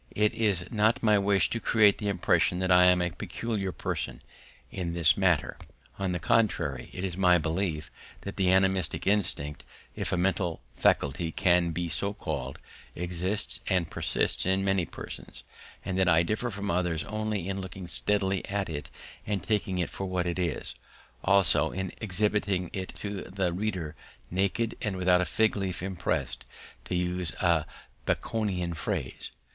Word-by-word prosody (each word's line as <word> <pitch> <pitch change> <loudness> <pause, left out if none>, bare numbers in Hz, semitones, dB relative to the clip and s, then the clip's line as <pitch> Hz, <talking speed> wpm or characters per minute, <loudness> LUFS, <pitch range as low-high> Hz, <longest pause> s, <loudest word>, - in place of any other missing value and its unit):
It 105 0 +3
is 100 -6 +1
not 110 +1 +2
my 105 -2 +5
wish 100 0 +3
to 115 - 0
create 105 -3 +4
the 105 - -2
impression 90 -2 +2
that 95 0 0
I 90 0 +7
am 90 0 +5
a 90 - -1
peculiar 100 +2 -3
person - - -4 0.5
in 85 -3 -3
this 85 +4 +5
matter; 95 -6 +2 0.4
on 95 -2 0
the 90 - 0
contrary, 110 +5 +1
it 90 - -6
is 95 -3 -2
my 90 -2 +5
belief 80 -1 -2 0.3
that 100 - -6
the 95 -2 +3
animistic 95 0 +2
instinct, 90 -8 0 0.3
if - - -3
a - - +1
mental 90 -2 0 0.2
faculty 80 +4 +2
can 90 0 +3
be 85 +1 -2
so 95 +6 0
called, 65 -8 -4 0.4
exists 90 +4 -2
and 90 -5 +1
persists - - 0
in 95 +1 +2
many 95 -3 +2
persons, - - -8 0.4
and 95 -1 -1
that 95 -1 +4
I 80 0 +5
differ 110 +7 -1
from 100 -1 -3
others 85 -2 0
only 110 -3 -2
in 95 0 -2
looking 95 0 -7
steadily 95 +3 +1
at 100 -2 -2
it 75 -2 -5 0.4
and 100 -4 -1
taking 100 -4 0
it 90 - -1
for 95 - -4
what 90 -1 -1
it 85 +1 -2
is, 85 -5 -2 0.5
also 95 -6 +4
in 95 +1 -4
exhibiting 100 -3 0
it 95 -1 -4
to 100 -2 -4
the 95 -2 -1
reader 90 -5 -2 0.4
naked 100 +5 0
and 100 -3 -2
without 90 0 +4
a - - +1
fig 110 +7 +2
leaf 95 -3 -3
expressed, 70 -9 -2 0.4
to - - -3
use 90 -4 -1
a 85 -1 +2 0.4
Baconian 95 -6 -1
phrase. 70 - -3
95 Hz, 165 wpm, -28 LUFS, 85-100 Hz, 0.5 s, I